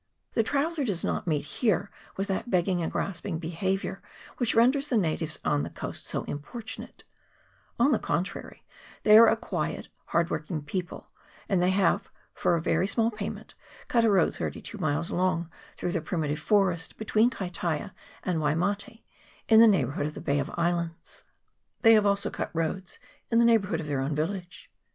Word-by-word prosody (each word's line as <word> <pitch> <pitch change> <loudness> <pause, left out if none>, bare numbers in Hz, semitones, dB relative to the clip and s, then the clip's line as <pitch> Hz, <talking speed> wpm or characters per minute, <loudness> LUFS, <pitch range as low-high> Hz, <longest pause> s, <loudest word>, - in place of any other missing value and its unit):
The - - +3
traveller 290 +6 0
does 200 -9 -1
not - - -2
meet 150 -3 0
here 215 - 0 0.3
with 195 +1 -1
that 195 +5 -2
begging 180 -2 +1
and 165 - -2
grasping 190 -2 -2
behaviour 180 +4 -2 0.4
which 245 -3 +1
renders 260 +5 +4
the 250 - +1
natives 160 -4 0
on 145 -1 +2
the - - -4
coast - - -7
so - - -2
importunate; 215 +11 -8 0.7
on 245 +5 +4
the 235 - +3
con 175 - 0
trary, - - -9 0.4
they 210 - +7
are 230 +1 +10
a 225 - +3
quiet - - -3 0.2
hard 170 0 0
working 155 -1 -3
people, 175 +4 -5 0.4
and 190 -3 +2
they 180 - +3
have, 190 -2 +2 0.2
for 175 - +1
a 165 - -1
very 185 - +1
small 225 +2 +2
payment, 210 -2 -6 0.4
cut 235 -2 +3
a 225 - +4
road 190 -5 +3
thirty - - -4
two 215 - -8
miles 155 0 -1
long 175 -2 0 0.3
through 175 - -2
the 170 - -1
primitive 155 -2 -2
forest, 180 -3 +1
between 220 +2 +3
Kaitaia 180 - -3 0.3
and 180 -3 0
Waimate, 200 +10 -1 0.4
in 220 -1 +7
the 230 - +9
neighbourhood 145 - +1
of 150 - -7
the - - -6
Bay 140 +1 +1
of 140 +4 -2
Islands; 170 -1 -2 0.6
they 225 -2 +7
have 210 -2 +5
also. 200 0 +1
cut - - -3
roads 165 +3 -2 0.3
in 230 - +2
the 235 - +6
neighbourhood 200 -7 +3
of 160 - -4
their 145 -3 -1
own 140 +3 -1
village. 175 +3 -4
185 Hz, 180 wpm, -28 LUFS, 165-220 Hz, 0.7 s, are